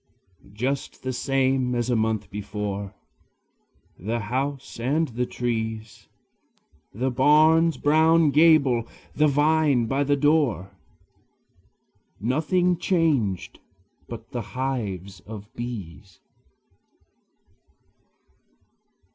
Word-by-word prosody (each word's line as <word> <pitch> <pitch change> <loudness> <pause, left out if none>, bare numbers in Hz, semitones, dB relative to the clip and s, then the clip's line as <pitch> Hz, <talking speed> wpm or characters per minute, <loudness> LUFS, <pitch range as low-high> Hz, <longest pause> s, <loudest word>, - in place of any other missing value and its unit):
Just 130 +7 -3
the 130 0 -2
same 130 -1 0
as 120 +1 -1
a - - +2
month 110 -3 -1
before, 100 -1 -5 1.0
The 110 +6 -2
house 135 +4 -4
and 145 +6 0
the 125 +1 -2
trees, 110 -2 -4 0.8
The 130 +5 -2
barn's 155 +5 +4
brown 160 +1 +4
gable, 140 -7 +4 0.3
the 150 +1 +4
vine 145 -3 +2
by 135 +4 0
the 145 0 +2
door, 135 - +1 1.4
Nothing 160 - +1
changed 150 - 0 0.5
but 115 +1 -9
the 120 -3 -3 0.2
hives 100 -8 -3
of 105 +1 -10
bees. 100 - -8
125 Hz, 90 wpm, -24 LUFS, 110-145 Hz, 1.4 s, barn's